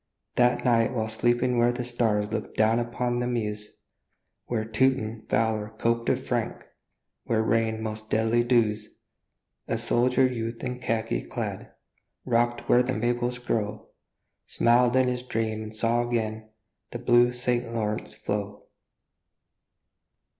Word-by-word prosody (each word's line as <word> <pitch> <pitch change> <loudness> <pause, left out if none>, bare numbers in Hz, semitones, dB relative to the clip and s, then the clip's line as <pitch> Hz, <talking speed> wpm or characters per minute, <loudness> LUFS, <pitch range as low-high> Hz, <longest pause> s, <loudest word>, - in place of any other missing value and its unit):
That 120 0 +3
night 115 -2 +3
while 110 -2 0
sleeping 120 +2 +1
where 120 +1 +4
the 120 0 -4
stars 110 -4 0
Look 115 - -4
down 110 +2 +3
upon 120 +1 -1
the 120 - -1
Meuse, 105 -3 -3 0.8
Where 110 -3 -1
Teuton 110 -1 0
valor 110 -1 0
coped 115 +1 0
with - - -1
Frank, - - -2 0.6
Where 110 -1 +1
rained 110 0 0
most 110 0 -5
deadly 115 +2 +2
dews, 115 -3 +1 0.8
A - - 0
soldier 125 +2 +2
youth 115 -2 -3
in 125 -1 -3
khaki 110 - -1
clad, - - -5 0.5
Rock'd 120 -1 +1
where 125 - +4
the 130 +1 -1
Maples 120 +2 0
grow, 110 -4 -3 0.6
Smiled 120 +1 +3
in 130 0 +4
his 125 0 -1
dream 110 -3 -2
and 110 0 -8
saw 115 +2 +2
again 110 -2 -2 0.4
The - - -5
blue 120 0 +4
St. 125 -1 -1
Lawrence 110 -2 -3
flow. 100 0 -4
115 Hz, 135 wpm, -26 LUFS, 110-120 Hz, 0.8 s, where